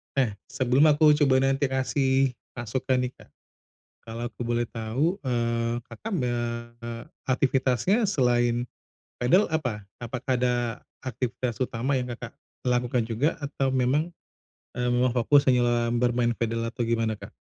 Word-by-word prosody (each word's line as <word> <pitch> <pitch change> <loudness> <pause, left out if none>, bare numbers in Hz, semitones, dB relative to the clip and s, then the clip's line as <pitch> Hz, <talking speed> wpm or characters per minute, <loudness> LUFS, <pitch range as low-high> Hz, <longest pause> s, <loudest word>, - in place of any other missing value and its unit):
Eh, 130 -6 +2 0.2
sebelum 130 +3 +3
aku 150 0 +6
coba 135 -3 +4
nanti 135 +1 +2
kasih 130 0 +1 0.2
masukan 125 +2 -1
nih, 125 - -2
Kak, - - -16 0.7
kalau 115 +1 -7
aku 120 - -11
boleh 120 0 0
tahu, 120 - -1
eee, 120 -2 0
Kakak, 225 - -8 0.2
eee, 120 -1 -4 0.3
aktivitasnya 130 - +2
selain 120 - +2 0.5
padel 180 +12 +4
apa? 125 -10 -2 0.2
Apakah 125 +1 -2
ada 125 -1 +2 0.5
aktivitas 125 -1 -3
utama 130 +2 0
yang 125 - -4
Kakak - - -8 0.3
lakukan 125 -1 +1
juga? 120 +8 0
Atau 140 -1 -1
memang, 130 +5 +1 0.6
eee, 125 0 -1
memang 125 0 +2
fokus 135 +4 +4
hanya 120 -2 +2
bermain 120 0 +2
padel 115 0 -2
atau 115 +1 -6
gimana 115 -2 0
Kak? - - -9
125 Hz, 135 wpm, -26 LUFS, 120-130 Hz, 0.7 s, aku